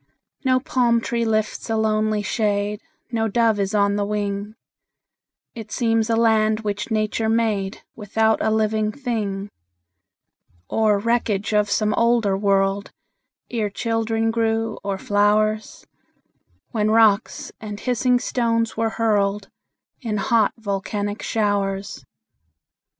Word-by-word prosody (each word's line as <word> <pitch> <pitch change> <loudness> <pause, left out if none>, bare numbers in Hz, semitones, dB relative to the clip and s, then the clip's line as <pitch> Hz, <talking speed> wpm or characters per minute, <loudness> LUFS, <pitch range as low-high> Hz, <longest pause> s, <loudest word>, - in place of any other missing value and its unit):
No 255 -1 +3
palm 245 -3 +2
tree 235 0 -2
lifts 215 0 -1
a 225 - +1
lonely 215 -1 +1
shade, 205 +1 -1 0.3
No 225 -1 0
dove 225 0 +2
is 200 +1 -1
on 200 0 +2
the 205 - 0
wing; 205 0 -3 1.0
It 225 -3 -9
seems 225 -2 +1
a 225 - +3
land 220 -1 +3
which 210 -1 -3
Nature 220 0 0
made 215 -4 0
Without 220 +1 +1
a - - +2
living 215 0 +1
thing, 210 -6 -3 1.2
Or 215 -2 +2
wreckage 215 -2 0
of 210 -1 +2
some 210 +1 +1
older 230 -4 +2
world, 195 0 +1 0.6
Ere 220 -4 -1
children 225 +1 -1
grew, 225 -1 -1
or 200 -1 -2
flowers, 210 +2 +1 0.9
When 215 -3 0
rocks 220 -2 +3
and 210 -2 -6
hissing 250 +1 +1
stones 230 -2 0
were 225 0 0
hurled 205 -3 0 0.5
In 220 -4 -2
hot, 220 +1 +2
volcanic 205 0 -3
showers. 200 -6 -1
215 Hz, 120 wpm, -22 LUFS, 205-225 Hz, 1.2 s, No